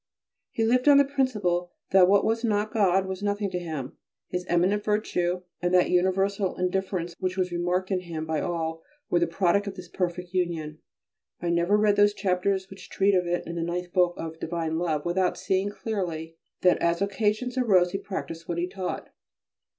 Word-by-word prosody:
He 225 - -1
lived 250 +4 +2
on 285 -1 +8
the 280 - +6
principle 210 -11 0 0.2
that 185 -1 +7
what 200 +1 +4
was 225 +1 0
not 215 -2 0
God 195 -3 +3
was 190 0 -5
nothing 205 -1 -1
to 180 - -2
him. 155 -6 -6 0.3
His 180 0 -3
eminent 185 +4 +2
virtue 180 -4 0 0.2
and 175 0 0
that 180 - +4
universal 190 +2 +1
indifference 180 -1 -2
which 185 0 -2
was 185 -1 0
remarked 180 +2 -1
in 190 - +2
him 165 -3 -5
by 160 -1 -1
all 165 -1 -3 0.3
were 175 - +4
the 170 - +2
product 190 +4 +1
of 195 - -5
this 180 -2 -9
perfect 180 0 -3
union. 165 -4 -2 0.6
I 170 - -1
never 170 +4 +3
read 210 -1 +3
those 205 0 +4
chapters 190 0 0
which 195 -1 -12
treat 200 +1 +2
of 180 -2 +2
it 175 0 -1
in 170 - -5
the - - -1
ninth 175 +1 -3
book 180 -2 +3
of 160 0 -6
"Divine 165 -1 -2
Love" 160 -3 -1
without 180 +1 +1
seeing 190 +1 0
clearly 175 -7 -4 0.3
that 180 - +4
as 170 +2 +2
occasions 215 +5 -1
arose 190 -9 +3
he 195 - -2
practised 165 -4 -6
what 170 - -3
he 175 +1 0
taught. 185 0 -5
180 Hz, 190 wpm, -26 LUFS, 175-200 Hz, 0.6 s, on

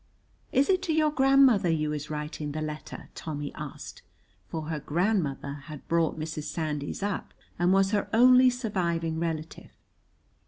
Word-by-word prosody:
"Is 270 +2 +3
it 375 -1 +2
to 325 - -1
your 310 -1 +3
grandmother 265 - +5
you 155 -2 0
is 150 0 -5
writing 150 -1 -4
the 155 - -3
letter?" 155 0 -7
Tommy 145 -2 -5
asked, - - -8 0.5
for 160 +8 -4
her 155 0 -3
grandmother 150 -4 -1
had 155 -4 -10
brought 165 -1 +1
Mrs. 155 -1 -4
Sandys 150 +1 -3
up 205 -1 -3 0.2
and 175 +1 +3
was 195 0 +3
her 205 -2 0
only 255 +2 +7
surviving 170 -9 -1
relative. 160 -1 -4
165 Hz, 150 wpm, -28 LUFS, 150-220 Hz, 0.5 s, only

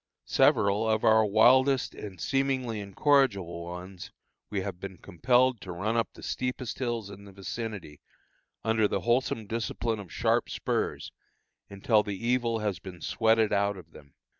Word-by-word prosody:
Several 100 +3 +3
of 110 0 +1
our 110 0 +5
wildest 125 +5 +4
and 95 -4 -9
seemingly 130 -4 -1
incorrigible 100 - +1
ones 90 +1 -8 0.4
we 100 -2 -2
have 95 -2 -5
been 95 -1 -7
compelled 125 +7 +1
to 95 - -7
run 100 +6 -2
up 115 -1 +1
the - - -13
steepest 125 -1 -3
hills 120 -5 -3
in 100 +1 -11
the 100 - -12
vicinity, 100 -5 -6 0.6
under 110 -1 +2
the - - -2
wholesome 120 -2 0
discipline 115 +1 -2
of 95 -4 -10
sharp - - +1
spurs, - - -2 0.6
until 105 +2 +2
the 105 -2 -5
evil 120 +1 0
has 105 -6 -2
been 90 0 -10
sweated 110 +1 +2
out 100 0 +1
of 90 - -13
them. 70 -1 -16
110 Hz, 155 wpm, -28 LUFS, 100-120 Hz, 0.6 s, our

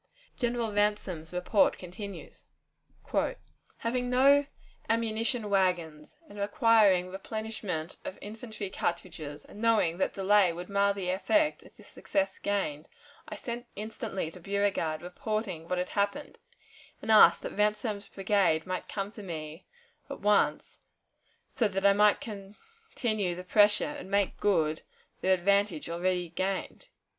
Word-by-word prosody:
General 235 -3 -1
Ransom's 205 -6 0
report 180 +3 +2
continues: 190 +3 -9 1.4
"Having 245 +1 -2
no 275 +3 +5 0.4
ammunition 225 0 0
wagons 175 -6 0
and 205 - -11
requiring 200 -3 +4
replenishment 195 -4 -5
of 185 - -6
infantry 215 -2 -7
cartridges, 165 -5 -4
and 210 - -12
knowing 210 -7 +2
that - - 0
delay 195 -1 +4
would 175 +3 -7
mar 200 0 +3
the 190 -2 -2
effect 305 - +1
of - - -18
the - - -15
success 290 -1 -2
gained, 170 -7 -2 0.4
I - - -5
sent 240 0 -6
instantly 210 -5 -4
to 180 - -12
Beauregard, 195 -4 -1
reporting 185 -2 -4
what 180 - 0
had 180 0 -2
happened, 205 +8 -2 0.6
and 220 - -2
asked 215 - +7
that - - -5
Ransom's 210 0 0
brigade 195 -5 +1
might 185 0 -4
come 200 0 -3
to 215 - -10
me 160 -3 -7 0.4
at - - -6
once, 210 -1 +1 0.7
so 230 - 0
that 195 0 -2
I 200 - +7
might 210 0 +4
continue 215 - -4
the 180 - -7
pressure 205 +2 +4
and 290 -9 -7
make 200 -1 +1
good 160 -6 +1 0.4
the 190 - 0
advantage 190 -2 +2
already 180 0 -1
gained." 190 - -3
200 Hz, 130 wpm, -29 LUFS, 180-220 Hz, 1.4 s, asked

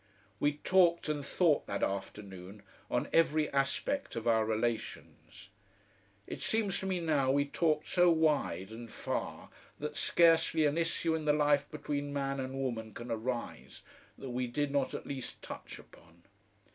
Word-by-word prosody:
We 145 0 +2
talked 170 +1 +3
and 145 -2 -1
thought 160 +1 +2
that 100 - -2
afternoon 100 0 -5 0.3
on 125 - 0
every 155 -2 +3
aspect 205 - 0
of 115 - -4
our 110 -1 +4
relations. 110 -2 -4 0.8
It - - -7
seems 215 -4 +1
to 190 - -4
me 185 -2 0
now 150 -5 +1
we 140 +1 +3
talked 155 +1 +1
so 180 -1 +4
wide 150 - +1
and 115 0 -9
far - - -4 0.3
that - - -5
scarcely 165 -2 +4
an 145 0 +2
issue 165 0 0
in 160 -1 -2
the 150 - +4
life 145 -1 +2
between 145 -1 -3
man 140 -1 -1
and 130 0 -4
woman 115 -5 -3
can 120 0 -7
arise 120 +2 -4 0.3
that 130 - -7
we 125 +1 -1
did 145 +4 -1
not 140 -2 0
at - - -6
least 135 -3 -5
touch - - -8
upon. 85 +1 -18
140 Hz, 160 wpm, -32 LUFS, 120-160 Hz, 0.8 s, our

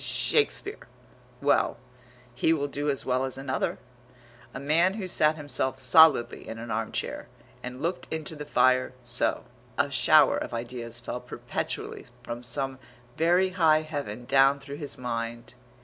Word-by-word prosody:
Shakespeare.... 435 -1 0 0.6
Well, - - +2 0.6
he 160 +6 +2
will 145 -3 -1
do 145 +1 -3
as 140 - 0
well 130 0 +1
as 130 -1 -4
another. 135 0 -2 0.7
A - - -7
man 165 +7 +2
who 210 -4 -4
sat 155 -4 +2
himself 130 -3 -2
solidly 135 0 +5
in 115 - -6
an 115 0 -7
arm 110 +1 -2
chair, - - -4 0.3
and 125 +3 -7
looked 175 +2 -3
into 160 0 -4
the 150 - -6
fire, 130 -3 +3
so 120 0 -1 0.3
A - - +1
shower - - +5
of - - -4
ideas 120 0 -6
fell 120 +1 -5
perpetually 125 - -5 0.2
from 120 0 -6
some 135 +1 -2 0.4
very 175 +3 +3
high 160 -4 +3
Heaven 140 -7 -5
down 135 +2 +4
through 140 +1 -8
his 145 -2 -3
mind. 115 -1 -5
135 Hz, 150 wpm, -27 LUFS, 120-155 Hz, 0.7 s, solidly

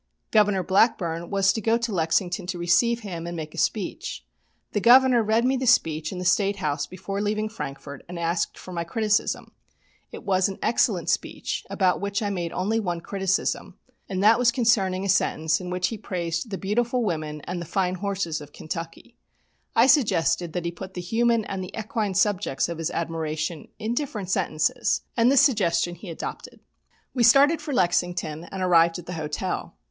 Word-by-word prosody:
Governor 205 -3 +3
Blackburn 175 -4 +1
was 195 -1 +3
to 220 - -3
go 225 +2 +2
to 235 -1 -3
Lexington 175 +2 0
to 180 - -3
receive 230 +8 +2
him 170 -5 -6
and 170 0 -5
make 155 -1 -6
a - - -5
speech. 210 -4 -2 0.5
The 205 - -1
Governor 250 +1 +6
read 220 +2 +2
me 265 +1 +2
the 260 0 -2
speech 160 -9 +2
in 185 - -6
the 180 - -4
State 200 +2 +3
House 145 -6 -2
before 195 +2 -5
leaving 215 +1 -1
Frankfort, 140 -8 -7
and 180 - -6
asked 170 +1 -1
for 185 - -10
my 170 -1 -2
criticism. 210 +4 0 0.6
It - - -9
was 190 -1 +2
an 195 - -6
excellent 225 -8 +1
speech - - -2
about 185 -2 +1
which 200 +1 -2
I 205 - -1
made 175 -3 -3
only 215 +5 0
one 175 -5 -2
criticism, 195 +2 -2 0.3
and 190 -1 -1
that 225 +3 +6
concerning 195 -7 +1
a - - -1
sentence 160 -3 +1
in 180 - -6
which 180 0 0
he 225 - -6
praised 170 +1 -3
the 195 - -4
beautiful 240 +5 0
women 155 -6 -3
and 175 +2 -5
the - - -5
fine 180 +2 0
horses 185 -4 -2
of 145 - -12
Kentucky. 165 +9 -7 0.6
I 230 - +6
suggested 185 - +2
that 175 -1 -3
he 170 - -1
put 190 +2 -9
the 180 - -3
human 230 +4 +1
and 190 -1 -4
the 185 - -8
equine 215 -2 -2
subjects 195 -8 +1
of 170 -1 -5
his 165 - -1
admiration 160 -1 -3
in 220 +2 -2
different 225 -9 -3
sentences, 155 -6 +1
and 235 +2 +4
this 275 - +6
suggestion 175 - +2
he 175 +2 -10
adopted. 165 - -7 0.5
We 250 - -1
started 275 +7 +6
for 295 - -5
Lexington 175 - 0
and 190 0 -5
arrived 170 -1 +4
at 175 - -9
the 180 - -6
hotel. 155 -2 -4
190 Hz, 185 wpm, -25 LUFS, 170-215 Hz, 0.6 s, Governor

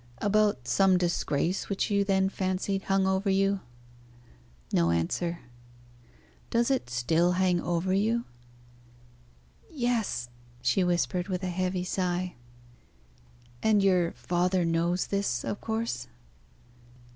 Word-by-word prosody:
"About 205 - +1
some 190 +3 +4
disgrace 175 0 -1
which 200 +1 -1
you 200 0 +3
then 190 -1 +2
fancied 195 0 -2
hung 195 0 +2
over 190 +1 +1
you?" 195 +1 +2 1.1
No 85 0 +3
answer. 85 - -1 1.1
"Does 235 +3 +2
it 260 - 0
still 160 +9 +2
hang 180 -1 +2
over 175 +2 0
you?" 225 +4 +1 1.4
"Yes!" 240 - -1 0.3
she 125 +10 +2
whispered, 180 0 0
with 185 -1 -3
a 185 - -1
heavy 185 0 -1
sigh. 180 -1 -1 1.3
"And 210 -2 +3
your 180 -3 +3
father 175 +8 0
knows 170 +2 +1
this, 200 -12 -1
of 205 - -4
course?" 225 - -3
185 Hz, 110 wpm, -28 LUFS, 175-200 Hz, 1.4 s, some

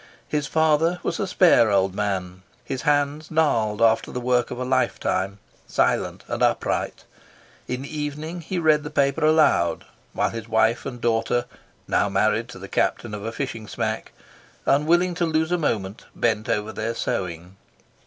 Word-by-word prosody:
His 150 -1 -1
father 160 +2 +2
was - - -2
a 200 - -1
spare 175 - +5
old 95 -2 +2
man, 95 -3 -3 0.2
his 130 - -4
hands 145 +1 +1
gnarled 115 -10 +1
after 115 0 +3
the 125 - -3
work 125 0 +1
of 125 - -6
a 125 - -2
lifetime, 100 -6 0 0.3
silent - - 0
and - - -4
upright; - - 0 0.6
in 125 +1 -3
the 145 +3 -8
evening 150 +4 -4
he 180 +3 -4
read 155 -3 +4
the 150 - -6
paper 140 +1 +1
aloud, 155 0 +3 0.3
while - - 0
his 115 0 -7
wife 110 +3 +2
and 125 -3 -6
daughter 120 +1 +1 0.4
(now - - +2
married - - +1
to - - -9
the - - -9
captain 115 -3 -1
of 105 -1 -5
a 115 - -3
fishing 115 -4 -5
smack), - - -3 0.5
unwilling 170 +5 +3
to 175 0 0
lose 160 +1 0
a 180 - +3
moment, 105 -9 -2
bent 110 -2 0
over 105 +1 0
their 110 +1 -3
sewing. 90 -2 -4
125 Hz, 165 wpm, -24 LUFS, 110-155 Hz, 0.6 s, spare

